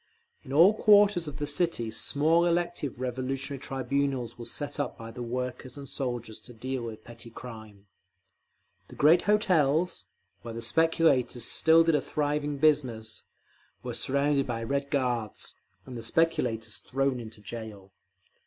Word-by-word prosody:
In 130 - -10
all 170 +9 +7
quarters 205 -5 +5
of 145 -2 -6
the 150 - -2
city 145 -6 0
small 160 +9 +2
elective 170 -6 -1
Revolutionary 130 +2 -3
Tribunals 135 -2 -2
were 120 - -9
set 145 +4 -5
up 145 - -2
by 115 -1 -8
the 125 +2 -8
workers 125 +1 -4
and 140 -1 -8
soldiers 120 -5 -4
to 125 - -9
deal 130 +3 -4
with 115 -2 -7
petty 115 0 -11
crime…. 110 -4 -11 1.0
The - - -13
great 160 +5 +5
hotels, 180 -5 +2 0.4
where 115 -1 -7
the 115 - -5
speculators 160 -4 +2
still 165 +1 +5
did 165 0 +2
a 150 - +2
thriving 145 -1 -1
business, 130 -7 +1 0.6
were - - -4
surrounded 140 +1 +1
by 115 -2 -3
Red 140 +3 -2
Guards, 125 -6 -2 0.3
and 130 - -9
the 115 - -5
speculators 115 -5 0
thrown 135 -1 -1
into 110 -2 -9
jail. 105 -3 -9
135 Hz, 145 wpm, -28 LUFS, 115-150 Hz, 1.0 s, all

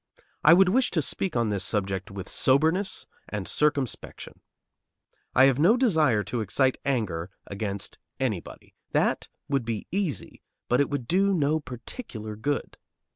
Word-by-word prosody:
I 160 +2 +8
would 190 0 +5
wish 250 +6 +3
to - - +4
speak 185 +4 -3
on 115 -2 +1
this 100 -3 -1
subject 95 -1 -1
with 100 -1 -7
soberness 160 +9 +2 0.2
and 105 -3 -4
circumspection. 145 -7 -1 1.0
I 130 - +7
have 135 -1 +3
no 195 +10 +5
desire 155 - +3
to 120 +1 -3
excite 130 +6 +1
anger 95 -11 -1 0.2
against 100 0 -5 0.2
anybody. 110 -10 -4 0.2
That - - +1 0.2
would 140 -3 0
be 115 -2 -3
easy, 190 -7 -2 0.3
but 125 +3 +3
it 140 - +1
would 140 -5 -3
do 195 +2 +3
no 155 -1 +2
particular 120 - -7
good. 140 +7 -3
130 Hz, 145 wpm, -27 LUFS, 105-160 Hz, 1.0 s, I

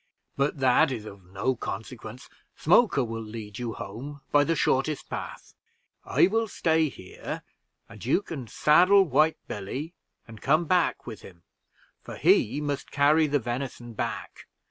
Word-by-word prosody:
but 140 +2 0
that 135 +3 +4
is 115 -4 -5
of 100 -2 -11
no 100 +8 -1
consequence 115 +3 -7 0.3
Smoker 170 - +4
will 115 -1 -4
lead 110 -1 -8
you 120 -2 -3
home 135 +10 -8
by 145 0 +5
the 165 +3 0
shortest 145 +1 0
path. - - -7 0.5
I - - +4
will 225 +4 +1
stay 160 -5 +1
here, 95 -7 -8 0.4
and - - -12
you 145 - +2
can 135 - -7
saddle 180 - +5
White 155 0 +2
Billy 130 - -5 0.3
and 110 -2 -12
come 155 +5 +3
back 180 +1 +1
with 110 -4 -8
him, 85 -2 -14 0.6
for - - -9
he 125 +7 +3
must 145 -2 -3
carry 150 +2 +4
the 145 0 +2
venison 120 -1 -5
back. - - -5
135 Hz, 150 wpm, -27 LUFS, 115-155 Hz, 0.6 s, by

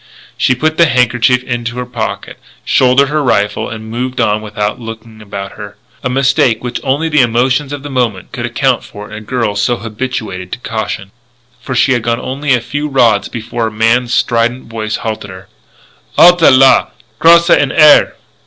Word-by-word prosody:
She 130 - +1
put 155 +4 -1
the 170 - +5
handkerchief 125 0 +2
into 120 -1 -4
her 125 - -3
pocket, 125 - -5 0.3
shouldered 130 +2 +3
her 150 0 0
rifle, 105 -6 0
moved 120 +4 -5
on 105 +1 +1
without 105 0 -3
looking 115 -1 -10
about 100 -1 -7
her, 105 -1 -10 0.3
a 130 - -1
mistake 130 -3 +1
which 125 - -4
only 140 +5 0
the 150 -3 +3
emotion 130 +4 +1
of 145 -1 -6
the 145 - -7
moment 120 -8 -2
could 120 -1 -4
account 130 0 0
for 105 +1 -11
in - - -8
a 110 - -7
girl 110 -2 -2
so 105 +4 0
habituated 110 -5 -5
to - - -3
caution, 100 -4 -5 0.5
for 130 - -5
she 130 +2 +3
had 120 - 0
gone 115 +1 -1
only 140 +1 -1
a 120 - -2
few 145 +5 -4
rods 120 -7 +2
before 115 0 -4
a - - -5
man's 115 +3 +1
strident 120 +1 0
voice 110 -1 -3
halted 110 -2 -5
her: 95 0 -12 0.7
"_Halte 175 -1 +6
là! 130 -1 +5 0.3
Crosse 170 +1 +5
en 145 - +3
air! 150 -1 +5
120 Hz, 180 wpm, -13 LUFS, 110-130 Hz, 0.7 s, Halte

